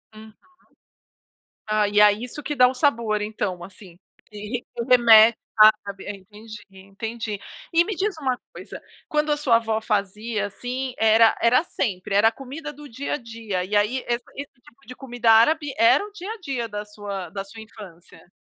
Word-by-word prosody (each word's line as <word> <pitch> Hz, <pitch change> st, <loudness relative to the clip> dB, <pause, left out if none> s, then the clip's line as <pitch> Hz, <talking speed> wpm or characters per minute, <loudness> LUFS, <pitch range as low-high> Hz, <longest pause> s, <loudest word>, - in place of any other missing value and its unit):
Uhum. 220 Hz, 0 st, -13 dB, 1.3 s
Ah 215 Hz, -1 st, +1 dB
e 205 Hz, 0 st, +2 dB
é 210 Hz, 0 st, +7 dB
isso 245 Hz, +7 st, -7 dB
que 295 Hz, -, -3 dB
dá 250 Hz, -1 st, +6 dB
o 255 Hz, -, -2 dB
sabor 230 Hz, -6 st, 0 dB
então, 195 Hz, -4 st, -4 dB
assim, 185 Hz, -2 st, -13 dB, 0.3 s
que 210 Hz, +3 st, -7 dB, 0.2 s
remete 230 Hz, -2 st, +7 dB, 0.2 s
a 215 Hz, -, +10 dB
arábia, 200 Hz, -2 st, -7 dB
entendi 210 Hz, +2 st, -13 dB
entendi. 205 Hz, +2 st, -7 dB, 0.3 s
E 340 Hz, +1 st, +3 dB
me 420 Hz, -2 st, -4 dB
diz 390 Hz, +2 st, -2 dB
uma 260 Hz, -3 st, -1 dB, 0.2 s
coisa, -, -, -10 dB, 0.3 s
quando 300 Hz, 0 st, 0 dB
a 295 Hz, -, +1 dB
sua 250 Hz, -6 st, +3 dB
avó 220 Hz, -1 st, -2 dB
fazia, 210 Hz, +1 st, -2 dB
assim, 250 Hz, +5 st, -5 dB
era 225 Hz, 0 st, +5 dB
era 250 Hz, +6 st, +4 dB
sempre, 200 Hz, -, -3 dB
era 220 Hz, +2 st, +5 dB
a -, -, -12 dB
comida 280 Hz, +5 st, -8 dB
do 295 Hz, +1 st, -12 dB
dia 265 Hz, +5 st, -5 dB
a -, -, 0 dB
dia, 225 Hz, -6 st, -5 dB
e 210 Hz, +2 st, -3 dB
aí 210 Hz, +6 st, +1 dB
eh, 240 Hz, -, +1 dB, 0.2 s
esse 280 Hz, 0 st, -8 dB
tipo 275 Hz, +4 st, -22 dB
de 255 Hz, -, -9 dB
comida 245 Hz, -3 st, 0 dB
árabe 285 Hz, +5 st, +3 dB
era 345 Hz, +4 st, +4 dB
o 420 Hz, -, -12 dB
dia 405 Hz, +1 st, -8 dB
a -, -, -10 dB
dia 265 Hz, -, -4 dB
da 210 Hz, -1 st, -6 dB
sua 205 Hz, -4 st, -7 dB
da 195 Hz, +2 st, -6 dB
sua 220 Hz, +3 st, -12 dB
infância? 185 Hz, -5 st, -14 dB
225 Hz, 180 wpm, -23 LUFS, 205-260 Hz, 1.3 s, a